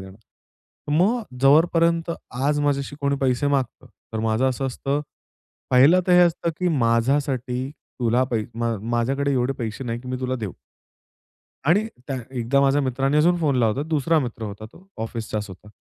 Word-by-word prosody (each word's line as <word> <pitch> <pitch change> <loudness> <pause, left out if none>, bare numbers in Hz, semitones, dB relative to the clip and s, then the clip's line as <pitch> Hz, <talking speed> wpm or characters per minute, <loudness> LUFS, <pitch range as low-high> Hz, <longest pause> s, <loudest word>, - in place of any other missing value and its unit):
देणार. 95 +1 -12 0.7
मग 195 +11 +2 0.2
जोपर्यंत 165 +3 +4 0.4
आज 145 0 +2
माझ्याशी 145 -1 -1
कोणी 140 0 +1
पैसे 130 +1 +1
मागतं, 130 -2 -2 0.3
तर 110 - -3
माझं 115 +4 +1
असं 130 +1 -2
असतं, 135 +2 -2 0.7
पहिलं 140 +8 +6
तर 180 - +3
हे 180 - +7
असतं 170 0 -1
की 180 - +1
माझ्यासाठी 125 +2 0 0.3
तुला 120 +2 +2
पै 115 -3 0
म 115 0 -1 0.2
माझ्याकडे 135 +4 0
एवढे 130 0 +1
पैसे 115 +2 -4
नाही 120 -1 -3
की 125 - -10
मी 130 - -2
तुला 130 0 -1
देऊ. 105 -6 -5 1.1
आणि 190 +8 +3 0.2
त्या 135 -2 -2
एकदा 130 +2 +1
माझ्या 140 +1 +3
मित्राने 135 +2 0
अजून 175 +3 +4
फोन 150 -5 +1
लावला 115 -4 +2
होता. 150 - -3
दुसरा 160 +1 +2
मित्र 120 -4 -5
होता 105 0 -6
तो 190 +2 -18 0.2
ऑफिसचाच 110 -2 -4
होता. 95 +3 -12
135 Hz, 165 wpm, -23 LUFS, 120-145 Hz, 1.1 s, हे